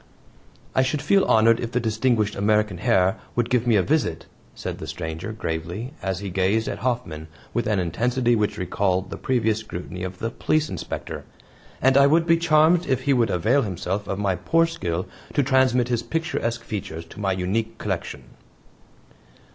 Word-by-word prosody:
"I - - +3
should 130 +3 0
feel 195 +6 +4
honored 115 +1 +4
if 120 +1 -4
the 125 - +2
distinguished 110 -1 +1
American 105 -2 +1
Herr 95 +1 +2 0.2
would 120 -1 0
give 125 -1 +2
me 115 - +4
a 95 - +4
visit," 155 +1 0 0.3
said - - -5
the - - -7
stranger 80 +4 -5
gravely, 90 - -4
as 95 0 -2
he 100 -2 -5
gazed 95 +5 +1
at - - -3
Hoffman 120 -11 -2 0.3
with - - 0
an 110 -2 +1
intensity 120 +7 +1
which 105 -1 0
recalled 95 0 -1
the - - -5
previous 110 -4 +1
scrutiny 90 -3 -7
of 90 0 -5
the 115 +4 -3
Police 155 +4 0
Inspector, - - -5 0.6
"and 135 +1 +5
I 140 0 +7
would 165 +3 +3
be 165 0 +4
charmed 165 +1 +4
if 130 -1 +1
he 140 +1 +2
would 120 -3 +2
avail 110 +11 +2
himself 95 -1 -3
of 95 - -2
my 100 -2 +1
poor 165 - +2
skill 90 - -3 0.3
to 145 - +3
transmit 130 -2 +3
his 120 -2 +1
picturesque 120 -4 -2
features 85 -7 -5
to 80 - -13
my 95 -2 0
unique 100 +5 -2
collection." - - -4
110 Hz, 180 wpm, -24 LUFS, 95-130 Hz, 0.6 s, I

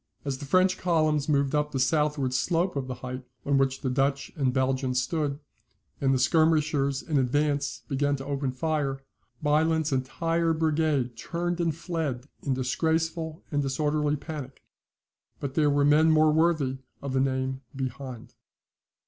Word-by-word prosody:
As 135 -2 -2
the - - -6
French 185 +5 +3
columns 155 -4 +1
moved 140 -1 +2
up 150 0 +1
the 135 - -2
southward 145 -1 +1
slope 170 +7 +1
of 135 -2 -2
the 130 - -4
height 130 +1 -5 0.2
on 140 -1 +3
which 135 -1 +1
the 130 - -1
Dutch 140 +1 0
and 135 -4 +1
Belgians 130 -1 +1
stood, 145 0 -1 0.6
and 135 -1 +3
the 135 - +3
skirmishers 150 0 +2
in 150 -4 +1
advance 145 +2 0
began 145 +1 +1
to 135 -1 -7
open 140 -1 -1
their 130 - -7
fire, 140 -3 -1 0.4
Bylandt's 160 +1 +2
entire 165 +6 0
brigade 155 -6 +1
turned 175 +8 -2
and 165 -3 0
fled 160 -7 -3 0.2
in 135 -2 -1
disgraceful 160 +4 -1
and 145 -1 +1
disorderly 150 +2 0
panic; 145 -2 -7 0.8
but 140 -2 -4
there 150 -1 +3
were 145 0 +3
men 155 +2 +5
more 155 -1 +5
worthy 155 -5 +2 0.2
of 140 -2 -3
the 135 - +2
name 130 0 -1
behind. 130 -2 -6
145 Hz, 155 wpm, -27 LUFS, 135-155 Hz, 0.8 s, men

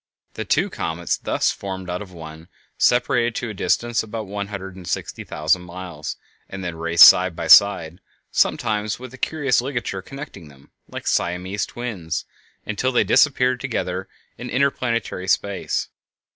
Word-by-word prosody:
The - - -5
two - - +1
comets 85 +1 -2
thus - - 0
formed 95 -2 -6
out 90 +1 -3
of 100 -3 -9
one 80 -1 -10 0.3
separated 120 -2 +2
to 120 - -3
a - - -7
distance 120 +4 0
of 110 - -10
about 110 0 -4
one 100 0 -4
hundred 95 -2 -7
and 90 -2 -11
sixty - - -3
thousand 80 +4 0
miles, 90 -3 -7 0.3
and 95 0 -7
then 85 -2 -4
raced 85 +1 +7
side 90 -2 +5
by 85 - -4
side, 85 0 +6 0.3
sometimes 105 -1 +1
with 130 0 -10
a - - -10
curious 140 -6 +1
ligature 120 -7 -3
connecting 120 - -9
them, 70 -1 -19 0.2
like - - -8
Siamese 95 +3 -1
twins, 100 -10 -4 0.4
until 115 +5 -1
they 125 - +3
disappeared 130 -3 +3
together 95 -7 -3 0.3
in - - -6
interplanetary 120 -7 -1
space. 100 +1 0
95 Hz, 160 wpm, -22 LUFS, 90-120 Hz, 0.4 s, raced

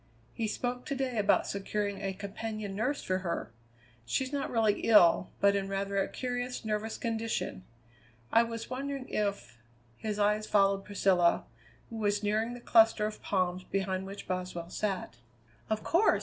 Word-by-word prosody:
He 225 - -1
spoke 245 +3 -3
to 280 - -1
day 260 -4 -1
about 205 - +3
securing 200 0 -2
a 195 -1 -2
companion 205 +1 -5
nurse 255 +8 -1
for 185 0 0
her. 170 -9 -3 0.5
She's 260 - -1
not 280 -1 -1
really 220 -3 +2
ill, 185 -5 +5
but 200 0 +4
in 195 -1 -1
rather 195 0 -2
a 195 - +2
curious 245 -1 -4
nervous 215 +1 -2
condition. 225 - -2 0.7
I 230 - +6
was 230 -1 -4
wondering 270 +1 -4
if 200 - -2 0.2
" 120 - -34
His 215 -2 -3
eyes 210 +1 +2
followed 195 -1 +3
Priscilla, 190 -4 +3 0.5
who 225 - -5
was 205 -1 0
nearing 220 +3 0
the - - -8
cluster 225 -2 +5
of 215 0 -5
palms 185 -2 0
behind 190 0 -2
which 200 +1 -8
Boswell 180 -2 -4
sat. 190 - -2 0.5
"Of 215 0 -1
course!" 365 +6 +4
210 Hz, 165 wpm, -31 LUFS, 195-230 Hz, 0.7 s, I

